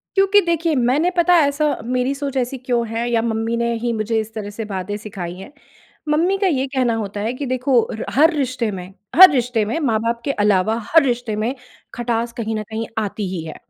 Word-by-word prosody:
क्योंकि 390 +1 +5
देखिए, 335 -1 +1
मैंने 265 +8 +2
पता 350 +1 +4
ऐसा 290 0 +1
मेरी 250 +3 0
सोच 280 -1 -5
ऐसी 260 +1 -1
क्यों 240 -2 -1
है 230 +2 -2
या 230 -1 +2
मम्मी 225 0 -1
ने 235 0 0
ही 240 -1 0
मुझे 220 0 -1
इस 220 0 -7
तरह 210 -2 -5
से 220 +2 -6
बातें 190 +2 -3
सिखाई 195 -5 -7
हैं। 190 +8 -11 0.6
मम्मी 335 +6 +2
का 390 - +1
ये 275 -7 +1
कहना 260 -3 0
होता 205 -2 -4
है 220 +3 -1
कि 280 +2 -5
देखो 255 0 +2
र 220 - -5
हर 315 +5 +5
रिश्ते 255 -5 -1
में 185 -1 -7 0.2
हर 370 +2 +11
रिश्ते 245 -5 0
में 225 +10 -2
माँ-बाप 230 -3 0
के 280 - 0
अलावा 210 +2 +2
हर 325 0 +7
रिश्ते 240 -4 -1
में 225 +5 -1 0.4
खटास 235 -1 -2
कहीं 225 -1 -3
न 215 - -2
कहीं 225 +1 -3
आती 210 -2 -3
ही 170 - -4
है। 160 - -7
235 Hz, 215 wpm, -20 LUFS, 220-275 Hz, 0.6 s, हर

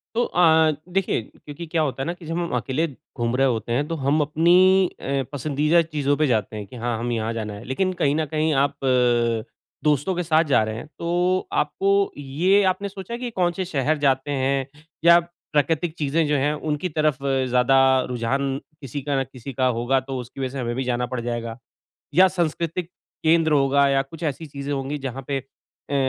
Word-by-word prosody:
तो 240 - +2
अ, 160 -2 +4 0.2
देखिए 195 -10 +1
क्योंकि 150 +8 -10
क्या 160 0 0
होता 135 -3 -2
है - - -4
ना 170 - -1
कि 175 -1 -14
जब 165 +2 -3
हम 170 -1 -2
अकेले 135 +7 0 0.3
घूम 120 +1 0
रहे 135 +1 +3
होते 115 -1 -2
हैं 145 +4 0
तो 165 - -3
हम 145 +1 +1
अपनी 180 +5 +4
अ, 135 0 -1
पसंदीदा 150 +4 +2
चीज़ों 150 -3 0
पे 155 - +2
जाते 110 -3 0
हैं 105 - -5
कि 125 - -12
हाँ, 120 -1 -2
हमें 120 0 -2
यहाँ 110 0 -2
जाना 110 -2 -4
है। 100 - -9
लेकिन 185 +8 -1
कहीं 145 0 +3
न 160 0 0
कहीं 155 0 +1
आप 145 - -4
अ, 120 -3 +2 0.4
दोस्तों 150 +5 +1
के 180 - -1
साथ 160 0 +3
जा 120 -5 +4
रहे 110 0 -4
हैं 115 - -7
तो 180 +2 0
आपको 150 +6 -1 0.3
ये 170 +9 +2
आपने 190 +2 0
सोचा 195 +4 -7
कि 245 -1 -4
कौन-से 180 -1 0
शहर 155 -2 0
जाते 135 0 +1
हैं 135 0 0 0.4
या 170 0 +8
प्राकृतिक 165 -1 -2
चीज़ें 155 +2 +1
जो 150 - +1
हैं 145 +3 +1
उनकी 150 +3 -2
तरफ 155 -3 +1
ज़्यादा 130 -1 +2 0.3
रुझान 135 +3 -1 0.2
किसी 135 +1 -5
का 140 0 -1
न - - 0
किसी 130 +1 -8
का 130 +2 0
होगा 130 +3 +2
तो 130 0 -6
उसकी 125 +2 -9
वजह 130 - -1
से 135 +1 -6
हमें 120 -1 -2
भी 130 - -1
जाना 125 -1 -1
पड़ 125 0 -4
जाएगा। 115 -1 -4 0.6
या 185 +3 +7
सांस्कृतिक 170 0 -2 0.3
केंद्र 160 0 +4
होगा 140 0 +4
या 135 0 +2
कुछ 160 +5 -13
ऐसी 155 +1 -3
चीज़ें 140 0 -5
होंगी 140 +2 -3
जहाँ 135 0 -5
पे 140 - 0 0.5
अ, - - -1
145 Hz, 205 wpm, -23 LUFS, 130-165 Hz, 0.6 s, या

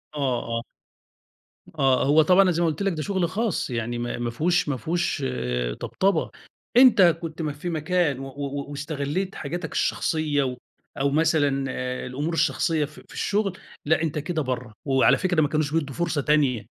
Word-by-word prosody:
آه، 130 -5 0
آه، - - -2 1.2
آه، 135 -2 +3
هو 150 +3 +5
طبعًا 180 +5 +5
أنا 190 -2 +4
زي 170 0 0
ما 170 - +3
قلت 155 +3 -2
لك 195 -3 +1
ده 155 - -4
شغل 185 0 0
خاص 210 - -1
يعني 120 0 -2
ما 120 0 -3
ما 120 0 -2
فيهوش 170 +5 +1
ما 135 - -1
فيهوش 160 +2 -1
آآ، 60 - -2
طبطبة 195 - 0 0.5
أنت 245 -5 +7 0.2
كنت 165 0 -6
ما 150 -2 -2
في 150 +5 -5
مكان 160 -3 0
و 135 - -6
و 140 +1 -5
واستغلّيت 150 +6 -3
حاجاتك 160 +3 -5
الشخصيّة، 150 -3 0
و 125 -1 -3 0.4
أو 140 +1 +2
مثلًا 145 -3 +2
آآ، 125 0 -4
الأمور 145 +6 -3
الشخصيّة 160 -2 +1
في 155 +6 -14
في - - -15
الشغل، 200 -2 -1 0.3
لأ 160 +1 +2
أنت 155 -2 -2
كده 160 +1 -2
برّه، 125 -5 -4
وعلى 135 -1 +4
فكرة 180 -4 +1
ما 150 - +3
كانوش 150 -1 -1
بيدّوا 145 -5 -1
فرصة 165 -4 0
تانية 140 -7 +2
150 Hz, 180 wpm, -25 LUFS, 135-170 Hz, 1.2 s, أنت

